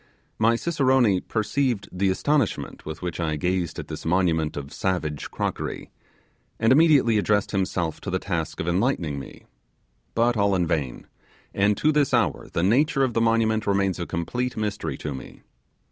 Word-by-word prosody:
My 115 Hz, +1 st, +4 dB
cicerone 130 Hz, -, +2 dB
perceived 110 Hz, +1 st, 0 dB
the 95 Hz, +1 st, 0 dB
astonishment 135 Hz, -, -1 dB
with 80 Hz, +3 st, -6 dB
which 90 Hz, -2 st, -4 dB
I 80 Hz, -2 st, 0 dB
gazed 90 Hz, +1 st, -1 dB
at -, -, -6 dB
this -, -, -7 dB
monument 80 Hz, -3 st, +1 dB
of 70 Hz, 0 st, -6 dB
savage 80 Hz, -6 st, -2 dB
crockery, -, -, -4 dB, 0.7 s
and 110 Hz, +1 st, +3 dB
immediately 135 Hz, -7 st, +5 dB
addressed 105 Hz, -1 st, +1 dB
himself 95 Hz, -4 st, -1 dB
in -, -, -4 dB
the -, -, +1 dB
task -, -, -3 dB
of 80 Hz, -, -3 dB
enlightening 85 Hz, -, 0 dB
me: 70 Hz, -, -11 dB, 0.7 s
but 120 Hz, +1 st, +3 dB
all 100 Hz, -2 st, +2 dB
in 90 Hz, -2 st, +1 dB
vain; 75 Hz, -7 st, -2 dB, 0.5 s
and 100 Hz, +1 st, +2 dB
to 155 Hz, -, +3 dB
this 145 Hz, -4 st, +2 dB
hour 115 Hz, -5 st, 0 dB
the 85 Hz, -, -1 dB
nature 135 Hz, -, +3 dB
of 130 Hz, -3 st, 0 dB
the 115 Hz, -, +1 dB
monument 115 Hz, -1 st, +2 dB
remains 100 Hz, -2 st, +1 dB
a 85 Hz, -, -3 dB
complete 120 Hz, +10 st, -3 dB
mystery 105 Hz, -1 st, -3 dB
to 75 Hz, -, -4 dB
me. 65 Hz, -, -10 dB
100 Hz, 165 wpm, -24 LUFS, 85-120 Hz, 0.7 s, immediately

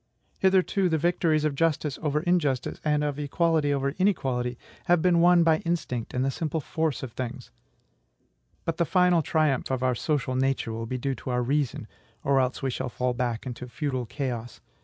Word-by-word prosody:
Hitherto 190 Hz, 0 st, +3 dB
the 160 Hz, -, +2 dB
victories 160 Hz, -1 st, +1 dB
of 150 Hz, -, +1 dB
justice 155 Hz, -1 st, 0 dB
over 150 Hz, -1 st, 0 dB
injustice, 160 Hz, -7 st, 0 dB
and 150 Hz, -1 st, +1 dB
of 145 Hz, -1 st, -2 dB
equality 155 Hz, 0 st, +1 dB
over 140 Hz, -1 st, 0 dB
inequality, 130 Hz, -11 st, 0 dB, 0.3 s
have 175 Hz, -1 st, +4 dB
been 175 Hz, 0 st, +3 dB
won 175 Hz, 0 st, +6 dB
by 160 Hz, -1 st, +4 dB
instinct 140 Hz, -10 st, -3 dB
and 125 Hz, +1 st, +1 dB
the 135 Hz, -, +1 dB
simple 160 Hz, +3 st, -2 dB
force 160 Hz, -1 st, -2 dB
of 130 Hz, -, -5 dB
things; 125 Hz, +1 st, -6 dB, 1.1 s
but 165 Hz, 0 st, -2 dB
the 170 Hz, -, +3 dB
final 180 Hz, -1 st, +4 dB
triumph 155 Hz, -4 st, +1 dB
of 130 Hz, -1 st, -1 dB
our 130 Hz, 0 st, +2 dB
social 135 Hz, +1 st, -1 dB
nature 130 Hz, -3 st, 0 dB
will 115 Hz, 0 st, -4 dB
be 130 Hz, -, -3 dB
due 135 Hz, +2 st, -1 dB
to 130 Hz, -, -7 dB
our 125 Hz, 0 st, +1 dB
reason, 135 Hz, -4 st, -1 dB, 0.4 s
or 140 Hz, -1 st, +3 dB
else 130 Hz, +1 st, -1 dB
we 135 Hz, -, 0 dB
shall 130 Hz, 0 st, -3 dB
fall 125 Hz, +1 st, -1 dB
back 120 Hz, -2 st, -2 dB
into 125 Hz, 0 st, -6 dB
feudal 130 Hz, -2 st, -3 dB
chaos. 120 Hz, -3 st, -4 dB
140 Hz, 185 wpm, -27 LUFS, 125-165 Hz, 1.1 s, won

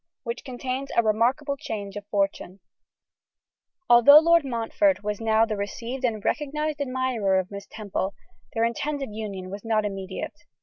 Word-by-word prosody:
Which 470 Hz, -, -5 dB
Contains 260 Hz, +1 st, -4 dB
a 235 Hz, -, +6 dB
Remarkable 245 Hz, +7 st, +1 dB
Change 210 Hz, -9 st, -6 dB
of 205 Hz, 0 st, -7 dB
Fortune. 195 Hz, -2 st, -1 dB, 1.3 s
ALTHOUGH 245 Hz, +5 st, +9 dB
Lord 335 Hz, 0 st, +5 dB
Montfort 255 Hz, +1 st, +1 dB
was 210 Hz, +1 st, -3 dB
now 220 Hz, 0 st, +3 dB
the 220 Hz, -1 st, -3 dB
received 230 Hz, +6 st, -5 dB
and 220 Hz, -4 st, -1 dB
recognised 300 Hz, 0 st, -1 dB
admirer 255 Hz, -7 st, 0 dB
of 185 Hz, +1 st, -2 dB
Miss 200 Hz, 0 st, -8 dB
Temple, 200 Hz, -2 st, -4 dB, 0.4 s
their 225 Hz, -, +2 dB
intended 275 Hz, +1 st, -3 dB
union 200 Hz, -4 st, -6 dB
was 200 Hz, 0 st, -7 dB
not 220 Hz, -2 st, +1 dB
immediate. 195 Hz, -2 st, -6 dB
225 Hz, 145 wpm, -25 LUFS, 205-270 Hz, 1.3 s, ALTHOUGH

